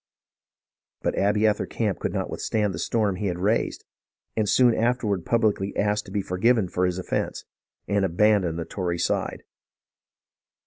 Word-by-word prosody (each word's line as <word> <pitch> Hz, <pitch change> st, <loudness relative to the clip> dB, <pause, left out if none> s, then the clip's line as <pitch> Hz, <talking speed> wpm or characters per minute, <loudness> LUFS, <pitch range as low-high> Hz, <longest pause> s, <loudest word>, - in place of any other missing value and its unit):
But -, -, +1 dB
Abiather 105 Hz, +1 st, +2 dB
Camp 105 Hz, -5 st, -1 dB
could -, -, -2 dB
not -, -, -2 dB
withstand 105 Hz, -3 st, -1 dB
the -, -, -5 dB
storm 105 Hz, -5 st, 0 dB
he 100 Hz, -, -2 dB
had 90 Hz, -2 st, -2 dB
raised, 105 Hz, +6 st, 0 dB, 0.5 s
and 110 Hz, -2 st, +1 dB
soon 125 Hz, -2 st, +5 dB
afterward 115 Hz, -6 st, 0 dB
publicly 105 Hz, -4 st, +1 dB
asked 105 Hz, +1 st, +1 dB
to -, -, -10 dB
be 100 Hz, -1 st, -1 dB
for 90 Hz, 0 st, -4 dB
given 115 Hz, -2 st, +3 dB
for 90 Hz, +1 st, +1 dB
his 90 Hz, 0 st, -2 dB
offence, 95 Hz, -, -3 dB, 0.4 s
and 100 Hz, -1 st, +1 dB
abandoned 95 Hz, -2 st, +2 dB
the 85 Hz, -, -3 dB
Tory 85 Hz, 0 st, -3 dB
side. -, -, -1 dB
100 Hz, 155 wpm, -25 LUFS, 90-110 Hz, 0.5 s, soon